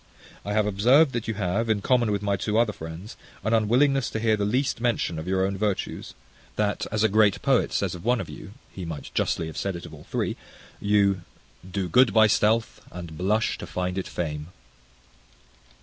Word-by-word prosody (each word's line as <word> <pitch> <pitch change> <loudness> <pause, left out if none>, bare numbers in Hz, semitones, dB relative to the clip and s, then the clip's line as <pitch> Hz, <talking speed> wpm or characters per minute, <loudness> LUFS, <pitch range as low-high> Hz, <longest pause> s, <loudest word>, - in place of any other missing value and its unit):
I 105 - -3
have 105 0 +2
observed 125 +9 +4
that 120 -2 -3
you 110 - -2
have, 100 +4 -1
in 105 -2 +1
common 120 -4 +2
with 100 0 -1
my 100 -1 +1
two 105 +3 -1
other 115 -2 +3
friends, 80 +6 -8 0.3
an 110 +3 0
unwillingness 125 +5 +3
to 110 - -3
hear 110 -1 +2
the 105 -1 -1
least 125 +3 0
mention 115 -9 0
of 80 - -7
your 95 0 +1
own 100 0 -2
virtues; 105 -2 -2 0.4
that, 105 -1 -1
as 105 0 +1
a - - +6
great 105 -1 +3
poet 135 -3 +2
says 95 -3 -1
of 90 - -8
one 120 +1 +2
of - - -4
you, 100 - -10 0.2
(he 95 - -7
might 80 -4 -6
justly 80 - 0
have 80 - -8
said 100 -2 -2
it 85 - -7
of 80 - -11
all 75 - -12
three), - - -2 0.4
you 100 -2 +2 0.5
Do 95 -1 -2
good 125 -1 +4
by 110 0 +7
stealth, 110 +2 +1
and 85 -3 -8
blush 105 +6 0
to - - -7
find 90 0 -3
it 95 - -3
fame. 75 -3 -4
105 Hz, 205 wpm, -25 LUFS, 90-110 Hz, 0.5 s, by